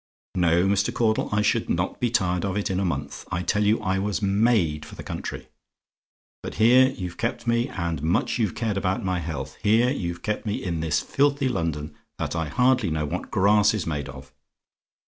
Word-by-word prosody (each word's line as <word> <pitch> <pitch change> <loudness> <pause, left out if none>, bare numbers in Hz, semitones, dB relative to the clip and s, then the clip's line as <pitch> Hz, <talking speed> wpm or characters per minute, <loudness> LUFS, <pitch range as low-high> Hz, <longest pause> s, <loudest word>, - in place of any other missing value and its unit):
"No, 85 0 +3
Mr. 100 +3 +2
Caudle, 115 -2 +1
I 105 0 +2
should - - +1
not - - -1
be 120 - +1
tired 90 -6 +1
of 100 0 -1
it 100 - -1
in 95 - 0
a - - 0
month. 70 -4 -3
I 85 +1 -1
tell 105 +4 +1
you 105 +2 +3
I 95 +1 0
was 100 +1 -1
made 100 -7 +2
for 75 - -11
the - - -8
country. - - -6 0.9
But - - -6
here 125 +4 +6
you've 90 -6 -6
kept 115 +2 -2
me 115 0 +1
and 85 -5 -3
much 80 +9 0
you've 105 -6 0
cared 110 -3 -1
about 95 0 -1
my 90 -1 0
health 70 -5 -5
here 115 +4 +3
you've 85 -9 -4
kept 105 0 -2
me 105 -2 -2
in 85 -3 -2
this 80 -2 0
filthy 140 0 +1
London, 80 - -2 0.2
that - - -3
I 80 -1 -1
hardly 125 - +2
know 80 -1 -1
what 75 - -4
grass 105 +2 +4
is 105 - -2
made 75 -3 -3
of. 65 -2 -11
95 Hz, 200 wpm, -25 LUFS, 80-110 Hz, 0.9 s, here